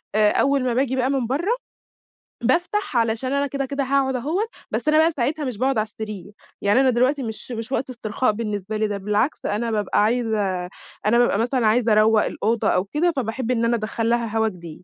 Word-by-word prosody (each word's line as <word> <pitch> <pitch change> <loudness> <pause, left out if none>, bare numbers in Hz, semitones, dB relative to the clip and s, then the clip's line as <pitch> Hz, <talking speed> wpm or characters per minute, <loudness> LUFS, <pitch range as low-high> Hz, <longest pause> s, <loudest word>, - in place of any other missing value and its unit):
آآ 210 -1 +4
أول 275 -1 +2
ما 250 -2 0
باجي 260 +1 +1
بقى 260 0 +1
من 270 -4 0
برّا 310 - 0 0.9
بافتح 345 - 0
علشان 230 +3 0
أنا 280 0 +1
كده 275 0 -3
كده 275 +1 -2
هاقعُد 265 0 +1
أهون 310 - -1 0.3
بس - - -3
أنا 305 0 +4
بقى 320 +1 +5
ساعتها 290 +2 -2
مش 250 -5 -4
باقعُد 265 +3 +1
على 215 - +2
السرير 210 -3 -8 0.3
يعني 205 +5 +3
أنا 265 -1 +4
دلوقتي 255 +3 +2
مش 220 +2 -7
مش 230 +1 -5
وقت 265 0 -1
استرخاء 235 -1 -1
بالنسبة 210 -1 -3
لي، 215 0 +1
ده 205 -1 -3
بالعكس 210 +8 -1
أنا 225 +3 -1
بابقى 210 -1 +1
عايزة 210 -5 0 0.4
أنا 220 +3 +4
بابقى 240 -4 +3
مثلًا 240 0 +1
عايزة 230 +1 +3
اروّق 215 0 +5
الأوضة 225 +1 -1
أو 180 - +2
كده 300 - +1
فباحب 255 -3 -2
إن 230 -2 +1
أنا 235 +1 +2
ادخّل 225 +1 -2
لها 235 -2 0
هوا 220 0 +3
جديد 170 -4 -8
235 Hz, 205 wpm, -22 LUFS, 215-265 Hz, 0.9 s, بقى